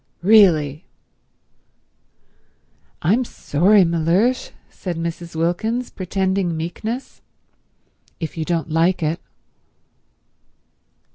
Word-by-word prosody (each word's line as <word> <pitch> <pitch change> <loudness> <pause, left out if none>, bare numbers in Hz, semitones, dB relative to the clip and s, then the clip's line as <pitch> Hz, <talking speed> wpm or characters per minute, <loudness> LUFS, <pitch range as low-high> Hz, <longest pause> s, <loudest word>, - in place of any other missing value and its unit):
"Really—" 175 -7 +4 2.2
"I'm 210 +10 +3
sorry, 195 -1 +3
Mellersh," 170 +10 +1 0.2
said 180 -3 -6
Mrs. 170 0 -5
Wilkins, 220 +9 -1
pretending 190 -2 -1
meekness, 215 +10 -5 1.0
"if 160 -3 -5
you 160 - -2
don't 165 -1 -2
like 170 +2 +2
it." 155 +2 -1
175 Hz, 75 wpm, -20 LUFS, 165-200 Hz, 2.2 s, Really